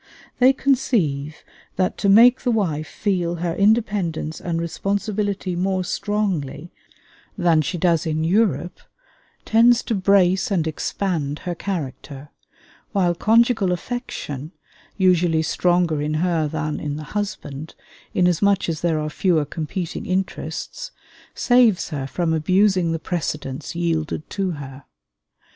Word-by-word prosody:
They 255 +1 +7
conceive 185 - 0 0.3
that 185 0 0
to 200 - +2
make 235 +5 +7
the 250 - -1
wife 165 -10 0
feel 180 -5 -1
her 170 0 -2
independence 200 -6 0
and 165 -1 -2
responsibility 200 +2 -2
more 185 +1 0
strongly 175 -7 -2 0.7
than 170 -4 +3
she 155 +4 -3
does 165 -1 +1
in 155 0 -1
Europe 175 -3 +1 0.7
tends 235 +2 +4
to 235 - -2
brace 190 +1 +3
and 180 -6 +1
expand 155 -2 -2
her 175 - -1
character; 145 -6 -6 0.6
while 180 -4 +2
conjugal 225 +1 +3
affection, 175 - -5 0.4
usually 175 -4 +3
stronger 175 -2 +1
in 150 +1 -1
her 165 -1 +1
than 155 0 -3
in 145 -1 -3
the 155 - -6
husband, 165 -8 -5 0.4
inasmuch 180 +2 +2
as 160 -2 -3
there 170 -2 +1
are 150 - -2
fewer 160 0 +1
competing 160 +4 -5
interests, 190 - -3 0.5
saves 245 -6 +3
her 140 -4 -4
from 165 +3 -1
abusing 185 +2 +2
the 165 - -1
precedence 150 -4 -4
yielded 160 -2 -2
to 195 -2 -1
her. 140 -2 -9
175 Hz, 125 wpm, -22 LUFS, 155-200 Hz, 0.7 s, They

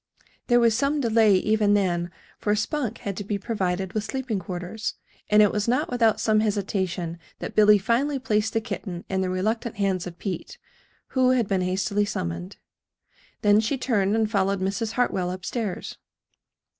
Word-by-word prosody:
There 240 -1 +5
was 230 -2 +4
some 280 +4 +1
delay, 225 -5 +4
even 210 +1 +3
then, 175 -3 0 0.3
for 210 0 +1
Spunk 235 +1 -2
had 200 -2 -4
to 205 - -3
be 205 +1 -2
provided 190 -3 -2
with 215 - -1
sleeping 255 -4 -3
quarters; 180 +4 -5 0.3
and 210 0 +6
it 205 - +4
was 210 +1 -1
not 255 +5 +1
without 230 -3 +3
some 215 -1 +3
hesitation 190 -5 -1 0.2
that - - -6
Billy 210 0 +6
finally 245 +8 +1
placed 220 -4 0
the 225 - +1
kitten 180 -5 -6
in 190 -1 0
the 185 - -1
reluctant 215 +5 -1
hands 195 -3 0
of 175 -1 -9
Pete, 190 -2 -5 0.5
who 255 -1 +3
had 250 -4 +2
been 195 -2 +1
hastily 195 +3 0
summoned. 85 - -4 0.9
Then 205 0 +5
she 225 +6 0
turned 210 -6 +1
and 225 -1 +2
followed 200 -2 +1
Mrs. 200 +4 -2
Hartwell 190 -7 0
up 185 0 -6
stairs. 220 -7 -4
210 Hz, 170 wpm, -25 LUFS, 190-225 Hz, 0.9 s, and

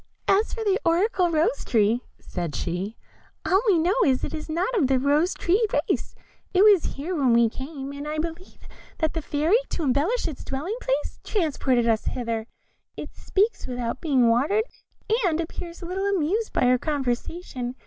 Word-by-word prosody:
"As 410 +3 +3
for 455 - -4
the 400 -1 +2
oracular 360 +2 +2
Rose 335 +10 +1
tree," 225 0 +2 0.2
said 170 -6 -5
she, 180 - -3 0.5
"all 380 +2 +3
we 390 -5 +5
know 340 +4 +2
is, 260 -2 +2
it - - -3
is 310 0 -6
not 360 +10 -1
of 330 - +3
the 265 0 +3
rose 290 +7 +2
tree 385 +7 +2
race, - - -1 0.4
it 375 - +6
was 410 -5 +5
here 325 +7 -4
when 265 -6 +3
we 235 -1 +5
came, 270 +2 -7
and 285 +1 -7
I 305 +1 -3
believe 330 +3 -6 0.3
that 315 -1 0
the 325 - -2
Fairy, 310 +9 +2
to 335 - -3
embellish 295 - +1
its 305 -5 -7
dwelling 310 - -4
place, 275 +3 -2
transplanted 275 - +1
us 225 -1 +1
hither; 230 -3 -3 0.5
it - - -7
speaks 415 +4 0
without 245 0 -3
being 265 -7 +3
watered, 280 - +3 0.6
and 335 -4 +1
appears 335 +1 -6
but 340 - -7
little 385 +2 -1
amused 400 +4 0
by - - 0
our 250 0 +4
conversation. 260 -2 -3
310 Hz, 180 wpm, -25 LUFS, 255-365 Hz, 0.6 s, it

